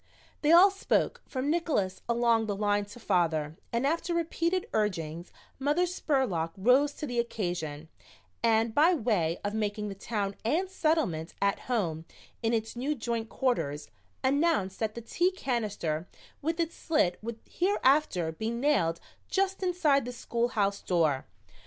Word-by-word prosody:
They 300 - +3
all 365 +4 +8
spoke, 390 - 0
from 265 +2 -1
Nickols 280 - 0
along 235 -1 +3
the 205 - -1
line 205 0 +1
to 205 +4 -12
father, 160 -7 +1 0.2
and 235 +3 0
after 335 +3 0
repeated 340 +3 0
urgings 170 -5 -2 0.3
Mother 295 +6 +2
Spurlock 260 - 0
rose 255 +8 +4
to 300 - -5
the 245 -4 -2
occasion, 175 -9 -3 0.5
and 225 -1 +3
by 325 +7 +5
way 205 - +1
of 205 - -2
making 210 -1 -2
the - - -4
Town 200 0 -3
and 320 +12 +1
Settlement 310 - 0
at 200 0 +1
home 170 -10 -1 0.4
in 225 -1 +1
its 225 0 -1
new 275 +5 -1
joint 230 -2 -3
quarters 150 - -1 0.3
announced 275 - +1
that 220 -1 -1
the 235 - -5
tea 345 +10 +1
canister 210 - -2 0.3
with 325 +3 -2
its 335 0 -1
slit 300 - +1
would 230 +1 -5
hereafter 290 - +2
be 220 +8 -3
nailed 235 - +1 0.3
just 385 0 0
inside 345 -8 +2
the 250 - -4
schoolhouse 230 -5 -1
door. 155 -7 +1
230 Hz, 145 wpm, -29 LUFS, 190-300 Hz, 0.5 s, all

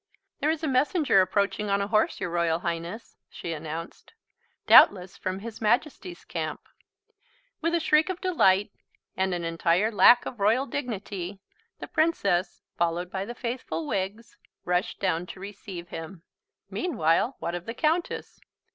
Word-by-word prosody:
"There 295 - +1
is 320 0 -1
a - - 0
messenger 275 - +3
approaching 200 +2 0
on 200 0 +2
a 200 - 0
horse, 215 0 +1
your 175 - -3
Royal 170 -1 +1
Highness," 170 +6 -5
she 165 - -6
announced. 160 - -7 0.5
"Doubtless 185 -2 +6
from 185 0 -3
His 225 0 -8
Majesty's 280 - -1
camp." - - -4 1.0
With 335 +1 +1
a - - +2
shriek 310 +1 +3
of 370 -1 -3
delight, 205 - +3 0.4
and 190 0 0
an 175 - -4
entire 170 +5 +1
lack 240 +3 +6
of 240 - -7
royal 225 +7 +3
dignity, 205 -8 -5 0.4
the - - -8
Princess, 200 - 0
followed 175 +1 -1
by 190 0 -3
the 240 +3 -7
faithful 235 -11 -4
Wiggs, 195 +7 -4 0.3
rushed 180 +2 -1
down 180 -2 0
to 185 - -9
receive 190 -3 -8
him. 165 +1 -8 0.4
Meanwhile, 230 - +1
what 170 - -4
of 175 0 -6
the 230 - -4
Countess? 325 +6 -1
200 Hz, 150 wpm, -27 LUFS, 175-245 Hz, 1.0 s, Doubtless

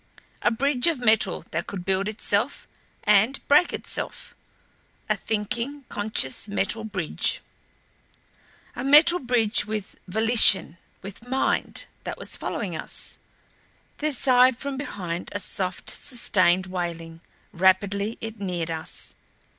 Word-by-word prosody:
A - - +3
bridge 255 +4 +1
of 330 -3 +1
metal 220 -6 +2
that 170 +1 -3
could 185 -3 -6
build 190 +1 0
itself 215 - -2 0.4
and 215 +6 +3
break 300 +5 +5
itself. - - -6 0.7
A - - +1
thinking, 235 +6 -3
conscious 205 -6 0
metal 205 +2 -1
bridge! 195 -7 0 1.3
A 245 - -5
metal 305 +6 +6
bridge 240 -3 +2
with 215 -2 -5
volition 215 -4 +5 0.2
with 200 +5 -10
mind 265 +1 -1 0.2
that - - -5
was - - -2
following - - -4
us. - - -3 0.8
There 305 +1 -1
sighed 255 -2 +4
from 280 +1 -4
behind 180 -11 -5
a 205 - -3
soft, 185 -2 -3
sustained 185 -7 +1
wailing; 170 -3 -5 0.3
rapidly 200 +4 +1
it 225 -1 -7
neared 175 -4 -3
us. 160 -1 -4
210 Hz, 120 wpm, -24 LUFS, 185-250 Hz, 1.3 s, metal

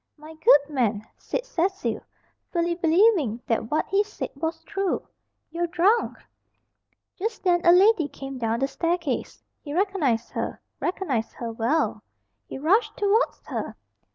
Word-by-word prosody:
"My 305 +2 -12
good 315 -2 +6
man," 230 -8 -1
said - - -3
Cecil, 390 -4 -1 0.5
fully 340 -1 +1
believing 335 - +3
that 225 -1 -1
what 305 - +1
he 395 +2 +2
said 420 - -6
was 320 +3 -3
true, 390 -2 -2 0.4
"you're 345 +1 -1
drunk." 370 +7 +2 1.0
Just 440 +5 -3
then 350 -2 +3
a 345 - +7
lady 370 -2 +5
came 270 -2 -8
down 230 +1 -1
the 270 - +2
staircase. 335 -3 -2 0.2
He 290 0 -6
recognised 335 - 0
her - - -4 0.2
recognised 280 - -2
her 235 -1 -5
well. 235 +8 0 0.5
He - - -6
rushed 360 - +2
towards 415 +4 +1
her. - - -4
335 Hz, 140 wpm, -25 LUFS, 270-385 Hz, 1.0 s, a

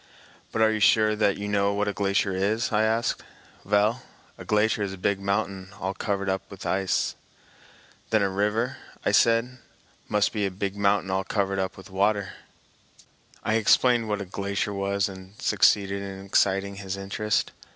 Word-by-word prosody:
"But 110 - +2
are 110 - +4
you 110 - -1
sure 110 0 +4
that 105 -2 +2
you 105 - -4
know 100 0 +1
what 105 0 0
a 105 - -1
glacier 100 0 0
is?" 105 +6 0
I 105 -1 +2
asked. 110 +2 +1 0.4
"Vell, 105 +4 +2 0.3
a - - -10
glacier 105 0 +1
is 100 -1 -1
a - - -8
big 95 +2 0
mountain 100 -1 -2
all 95 +1 -2
covered 100 -1 -2
up 95 0 0
vith 100 - -10
ice." 95 -1 0 1.0
"Then 110 -2 +3
a 100 - +1
river," 110 +6 0 0.3
said 115 0 +4
I, 125 +1 -15 0.5
"must 105 -1 +2
be 105 -3 0
a - - -2
big 95 +1 -4
mountain 100 -1 +1
all 95 0 0
covered 100 -1 -1 0.2
with 95 +1 -12
water." 100 0 +1 1.1
I 110 - +2
explained 115 +1 +3
what 105 -1 -1
a - - -4
glacier 100 +2 -3
was 100 0 0
and 95 +1 -11
succeeded 100 -1 +2
in 95 -1 -7
exciting 100 0 +1
his 95 -1 -5
interest. 100 +2 -1
100 Hz, 170 wpm, -26 LUFS, 95-105 Hz, 1.1 s, are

